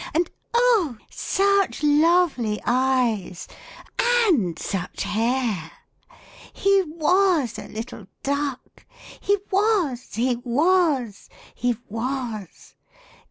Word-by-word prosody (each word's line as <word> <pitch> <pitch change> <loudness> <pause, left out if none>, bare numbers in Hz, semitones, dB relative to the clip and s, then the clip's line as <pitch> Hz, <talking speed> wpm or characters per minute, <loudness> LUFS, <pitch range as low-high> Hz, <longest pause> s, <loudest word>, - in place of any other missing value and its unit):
And 335 +2 +1 0.2
oh! 450 - +3
such 395 -3 +1
lovely 295 -7 +3
eyes! 240 -7 0 0.5
and 395 - +2
such 185 -3 -4
hair! 220 -4 -1 0.8
He 395 0 +3
loas 335 - +1
a - - -11
little 220 -2 -8 0.2
duck! 280 -2 -4 0.3
he 405 +1 +1
was, 380 - 0
he 245 +2 +1
was, 270 - +1 0.2
he 245 -1 -1
was. 230 -3 -5
265 Hz, 85 wpm, -23 LUFS, 230-360 Hz, 0.8 s, oh